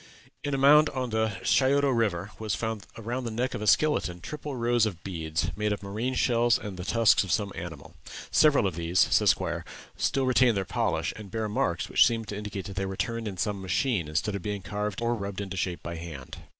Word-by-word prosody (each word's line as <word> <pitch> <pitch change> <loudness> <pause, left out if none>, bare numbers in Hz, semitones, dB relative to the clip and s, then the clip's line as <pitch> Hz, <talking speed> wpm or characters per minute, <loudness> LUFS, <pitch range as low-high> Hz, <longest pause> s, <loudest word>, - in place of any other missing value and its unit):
In 145 -1 -1
a - - -1
mound 150 +3 +6
on 130 -3 -3
the 110 -1 +1
Scioto 140 +4 +3
River 105 -6 0
was 110 -4 -1
found 110 +1 -4
around 120 +3 -4
the 120 - -3
neck 125 +4 -2
of - - -4
a 105 - -3
skeleton 105 -9 +2
triple 145 +7 -6
rows 120 -2 +2
of 85 -6 -7
beads, 85 -2 -2
made 105 0 -1
of 105 - -3
marine 110 +6 -2
shells 120 -2 +3
and 105 -2 -7
the 90 - -6
tusks 110 +4 +4
of 95 - -5
some 105 -2 0
animal. 80 -4 -8 0.4
"Several 145 -7 +5
of 95 - 0
these," 85 +2 -3
says - - +4
Squier, - - -3 0.3
"still 135 -1 +1
retain 125 -2 +4
their 95 -1 -1
polish, - - -1
and 105 -2 -9
bear 110 +1 -2
marks 90 -5 -1
which - - +5
seem 115 -2 -2
to 105 - -6
indicate 105 -2 -5
that 95 -2 -8
they 95 - 0
were 95 0 -5
turned 115 -1 -2
in 95 -3 -5
some 100 0 -2
machine, 95 - 0
instead 75 +7 -1
of 100 - -3
being 100 0 -4
carved 105 +1 -3
or 120 0 +1
rubbed 100 -3 -4
into 100 -1 -5
shape 90 -1 -3
by 85 0 -5
hand." 80 -6 -8
105 Hz, 225 wpm, -27 LUFS, 95-120 Hz, 0.4 s, mound